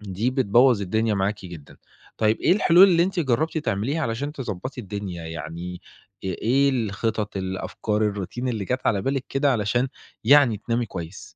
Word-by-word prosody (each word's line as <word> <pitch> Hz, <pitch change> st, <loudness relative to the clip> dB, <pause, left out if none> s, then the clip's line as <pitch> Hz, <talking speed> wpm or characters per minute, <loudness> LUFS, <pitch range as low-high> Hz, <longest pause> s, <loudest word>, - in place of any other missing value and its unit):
دي 105 Hz, +4 st, -2 dB
بتبوّظ 125 Hz, -2 st, +4 dB
الدنيا 110 Hz, +3 st, 0 dB
معاكِ 100 Hz, +1 st, -2 dB
جدًا. 85 Hz, -5 st, -11 dB, 0.4 s
طيب 110 Hz, 0 st, +2 dB
إيه -, -, +4 dB
الحلول 185 Hz, -1 st, +6 dB
اللي 170 Hz, -2 st, +4 dB
أنتِ 180 Hz, 0 st, -1 dB
جرّبتِ 155 Hz, +4 st, 0 dB
تعمليها 135 Hz, +3 st, -1 dB
علشان 135 Hz, +4 st, -2 dB
تضبّطي 130 Hz, -2 st, -5 dB
الدنيا، 100 Hz, -5 st, -6 dB
يعني 85 Hz, +2 st, -6 dB, 0.4 s
أ -, -, -3 dB
إيه 125 Hz, +9 st, +2 dB
الخطط، 110 Hz, -3 st, -2 dB
الأفكار، 105 Hz, +3 st, -2 dB
الroutine 105 Hz, +6 st, -4 dB
اللي 110 Hz, -5 st, -2 dB
جات 125 Hz, +7 st, -2 dB
على 100 Hz, -3 st, +1 dB
بالِك 135 Hz, +3 st, -1 dB
كده، 135 Hz, 0 st, +2 dB
علشان 120 Hz, +3 st, 0 dB, 0.4 s
يعني 130 Hz, -2 st, +6 dB
تنامي 115 Hz, +3 st, -2 dB
كويس؟ 90 Hz, -1 st, -8 dB
110 Hz, 160 wpm, -24 LUFS, 100-135 Hz, 0.4 s, الحلول